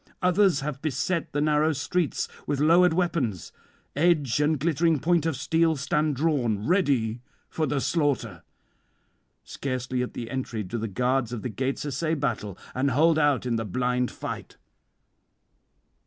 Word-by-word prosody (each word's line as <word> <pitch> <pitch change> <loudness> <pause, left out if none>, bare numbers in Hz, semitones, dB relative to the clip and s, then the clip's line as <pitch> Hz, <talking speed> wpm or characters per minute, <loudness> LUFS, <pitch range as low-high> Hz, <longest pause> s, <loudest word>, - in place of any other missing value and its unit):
Others 180 -4 +3
have 140 -1 -4
beset 155 +2 -1
the 145 - -1
narrow 150 +1 +2
streets 150 +4 -1 0.2
with 145 - -1
lowered 170 +4 +5
weapons; 160 - -1 0.4
edge 150 -5 +2
and 150 0 +2
glittering 165 +1 +2
point 165 +2 +2
of 160 - -1
steel 160 +4 +1
stand 150 +1 0
drawn, 125 -8 0
ready 135 - +1 0.3
for 155 -1 -1
the 145 - 0
slaughter; 145 -3 -1 1.0
scarcely 130 -2 -3
at 125 - -4
the 115 -1 -5
entry 125 -4 -3
do 100 +5 -4
the 115 - -2
guards 125 +3 0
of 120 -3 -5
the 125 - -2
gates 130 +6 -3
essay 155 +3 -1
battle, 110 - -3 0.2
and 135 +2 +1
hold 155 +5 +3
out 145 -4 +2
in 120 -2 0
the 115 - -2
blind 125 +4 0
fight." - - -7
140 Hz, 150 wpm, -26 LUFS, 125-160 Hz, 1.0 s, lowered